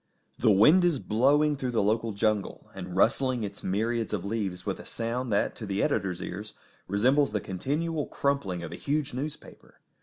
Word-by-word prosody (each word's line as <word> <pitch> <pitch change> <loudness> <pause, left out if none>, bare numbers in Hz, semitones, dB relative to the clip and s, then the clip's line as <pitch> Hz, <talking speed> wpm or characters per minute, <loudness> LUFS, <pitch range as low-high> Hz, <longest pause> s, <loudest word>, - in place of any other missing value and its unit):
The - - +4
wind 130 - +6
is 175 -5 +3
blowing 145 +7 +3
through 130 -2 -3
the 115 -4 +1
local 110 +2 +1
jungle, 105 -1 -1
and 90 -2 -7
rustling 125 +4 +2
its 100 0 -6
myriads 110 +4 -1
of 100 -3 -2
leaves 100 -4 -3
with - - -2
a - - -8
sound 115 +1 -3
that 100 - +1
to 110 - -6
the 100 +1 0
editor's 95 -4 -1
ears 105 +4 -6 0.3
resembles 130 +7 +2
the 105 - +1
continual 150 - -2
crumpling 105 -12 -1
of - - -6
a - - -5
huge 145 -1 -1
newspaper. 140 +4 -7
115 Hz, 180 wpm, -28 LUFS, 100-140 Hz, 0.3 s, wind